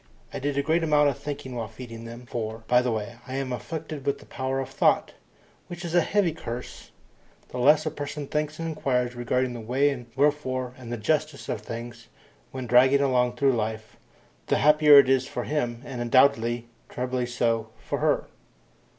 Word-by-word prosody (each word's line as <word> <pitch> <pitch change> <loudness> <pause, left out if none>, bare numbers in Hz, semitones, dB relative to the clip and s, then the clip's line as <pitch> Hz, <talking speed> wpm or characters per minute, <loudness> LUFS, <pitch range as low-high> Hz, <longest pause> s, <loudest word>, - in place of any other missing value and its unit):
I - - -3
did 140 +1 -2
a 140 - +2
great 160 +3 +1
amount 150 -2 +4
of 135 - -3
thinking 145 -3 -6
while 115 -2 -3
feeding 115 0 -10
them 120 +2 -9
for, 110 -1 -5
by 125 0 +5
the 125 -1 0
way, 110 -2 -4
I 130 - -5
am 135 -2 -2
afflicted 155 +2 -6
with 140 0 0
the - - -16
power 130 0 -3
of 135 - -4
thought, - - +2 0.5
which 175 +1 -7
is 170 - -4
a 175 - +5
heavy 195 0 +1
curse. 125 -5 -7 0.6
The 125 - -6
less 150 +6 +5
a 155 - -1
person 145 0 -5
thinks 150 +1 -2
and 165 - -4
inquires 125 -6 -1
regarding 125 +1 -1
the 120 - -6
why 130 +6 +2
and 125 -4 -5
the - - -27
wherefore 130 -3 0
and 125 -2 -10
the 120 - -2
justice 150 +6 -1
of 105 - -2
things, 115 +1 -8 0.4
when 130 -1 -5
dragging 130 +3 +5
along 125 -3 +2
through 135 +1 +3
life, 110 -1 -3 0.5
the - - +2
happier 150 0 +7
it 140 -2 +8
is 130 0 +2
for - - -4
him, 120 -5 -2
and 120 -2 -4
doubly, 120 -3 +3 0.2
trebly 125 0 -2
so, 115 -2 0
for - - -4
her. - - +1
130 Hz, 195 wpm, -26 LUFS, 120-145 Hz, 0.6 s, it